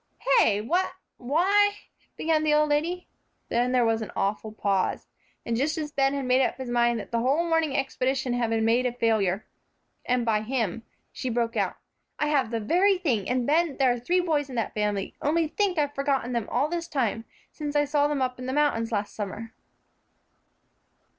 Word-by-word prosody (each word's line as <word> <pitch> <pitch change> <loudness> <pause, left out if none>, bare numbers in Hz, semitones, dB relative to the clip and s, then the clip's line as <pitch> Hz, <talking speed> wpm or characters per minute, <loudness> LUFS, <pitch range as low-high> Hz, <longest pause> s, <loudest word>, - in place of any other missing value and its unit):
"Hey, 205 -1 +3
what 355 - 0 0.2
why 390 +10 +2 0.2
" - - -39
began 315 -1 +1
the 300 -1 +3
old 300 0 +3
lady. 335 +5 -1 0.4
Then 245 +1 +1
there 250 -2 +3
was 225 0 +1
an 220 - -5
awful 210 +2 -1
pause. 200 -3 -1 0.4
And 230 - -1
just 290 +6 0
as 300 -2 -4
Ben 275 -1 +1
had 275 -2 -2
made 255 +1 +3
up - - -1
his 260 -2 -5
mind 240 -1 +2
that 205 - -9
the 235 - +1
whole 280 +8 +1
morning 325 -4 +1
expedition 265 -1 -1
had 240 -2 0
been 225 -1 +1
made 240 +3 +3
a 245 - -3
failure, 215 -5 +1 0.6
and 250 -1 0
by 215 -2 +2
him, 225 -3 -2 0.3
she 255 - -4
broke 230 -1 -1
out, - - 0 0.4
"I 300 - 0
have 275 -6 +2
the 230 -1 -2
very 365 - +3
thing, 250 - -1
and, 250 -1 0
Ben, 315 +1 +1
there 260 -3 +3
are 245 - -5
three 355 +10 +1
boys 300 -5 0
in 255 - -7
that 230 - -2
family. 210 -2 -1
Only 320 +2 +1
think, 390 0 0
I've 290 -1 0
forgotten 275 -3 -1
them 235 -3 -2
all 260 +5 +1
this 340 +1 -3
time, 230 -5 -1 0.3
since 295 -1 -5
I 290 0 +3
saw 290 0 +2
them 290 -3 0
up 250 -1 -3
in 255 - -6
the 260 - -2
mountains 280 -6 +1
last 205 -2 -2
summer." 215 +2 -6
255 Hz, 200 wpm, -26 LUFS, 230-300 Hz, 0.6 s, Hey